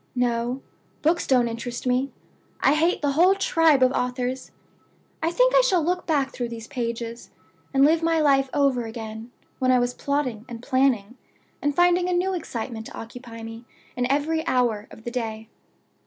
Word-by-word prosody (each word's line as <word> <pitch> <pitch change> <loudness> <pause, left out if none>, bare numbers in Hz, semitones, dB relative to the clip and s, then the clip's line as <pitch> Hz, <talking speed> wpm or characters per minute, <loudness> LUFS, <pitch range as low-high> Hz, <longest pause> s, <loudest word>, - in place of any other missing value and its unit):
No; 245 +1 0 0.4
books 330 +3 +2
don't 250 -3 +4
interest 235 +2 -5
me; 255 +2 +1 0.5
I 275 - +4
hate 325 +2 +1
the 285 - +2
whole 355 +7 +5
tribe 325 -7 +3
of 255 - +4
authors. 250 0 -2 0.7
I 325 - +1
think - - +3
I - - +7
shall 375 -10 +2
look 360 +3 -1
back 280 -4 +1
through 240 -2 -4
these 230 -1 -7
pages, 235 -2 -5 0.4
and 270 0 +5
live 320 +2 +3
my 330 0 +2
life 275 -3 +3
over 270 -4 +1
again 225 0 -7 0.3
when 255 - +1
I 255 - +5
was 245 0 0
plotting 260 -6 -2
and 235 -1 -8
planning, 255 -4 +1 0.4
and 290 0 0
finding 355 +1 +3
a - - +1
new 365 +2 +1
excitement 235 -9 -5
to - - -10
occupy 230 0 -9
me 225 +1 -8 0.3
in 250 +1 0
every 295 +3 +1
new 320 - -2
hour 235 -5 +1
of 220 - -14
the 240 - -5
day. 225 -2 -4
255 Hz, 180 wpm, -24 LUFS, 235-310 Hz, 0.7 s, I